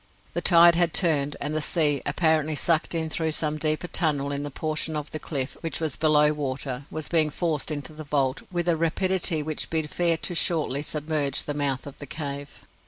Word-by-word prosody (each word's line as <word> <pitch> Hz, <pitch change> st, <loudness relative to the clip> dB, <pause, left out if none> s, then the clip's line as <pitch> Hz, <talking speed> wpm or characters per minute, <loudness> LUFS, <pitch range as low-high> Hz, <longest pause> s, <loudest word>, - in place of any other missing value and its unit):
The -, -, -2 dB
tide 170 Hz, -1 st, +7 dB
had 170 Hz, -1 st, +2 dB
turned, 150 Hz, -5 st, +3 dB
and 150 Hz, +1 st, -3 dB
the 155 Hz, -, 0 dB
sea, 150 Hz, -3 st, +3 dB
apparently 155 Hz, 0 st, +1 dB
sucked 165 Hz, +3 st, 0 dB
in 160 Hz, -1 st, -1 dB
through 160 Hz, 0 st, -1 dB
some 155 Hz, 0 st, -2 dB
deeper 155 Hz, +2 st, 0 dB
tunnel 145 Hz, -5 st, 0 dB
in 140 Hz, 0 st, -3 dB
the 145 Hz, -, -5 dB
portion 155 Hz, +2 st, -2 dB
of 150 Hz, -1 st, -5 dB
the 155 Hz, -, -5 dB
cliff 140 Hz, -3 st, -3 dB
which 165 Hz, -, -3 dB
was 155 Hz, -4 st, -2 dB
below 150 Hz, -1 st, +4 dB
water, 135 Hz, -2 st, -4 dB
was 155 Hz, -1 st, -3 dB
being 160 Hz, -3 st, +3 dB
forced 155 Hz, -2 st, -2 dB
into 145 Hz, -1 st, -5 dB
the 155 Hz, +1 st, -8 dB
vault 140 Hz, -3 st, -1 dB
with 175 Hz, -1 st, -2 dB
a 170 Hz, -, +3 dB
rapidity 165 Hz, 0 st, +1 dB
which 155 Hz, 0 st, -4 dB
bid 160 Hz, -2 st, -1 dB
fair 170 Hz, -2 st, +3 dB
to 175 Hz, -, -3 dB
shortly 155 Hz, -5 st, 0 dB
submerge 150 Hz, -2 st, -1 dB
the 145 Hz, -, -4 dB
mouth 140 Hz, -3 st, -1 dB
of 140 Hz, -, -11 dB
the 145 Hz, -, -8 dB
cave. 140 Hz, -1 st, -7 dB
155 Hz, 205 wpm, -25 LUFS, 145-160 Hz, -, tide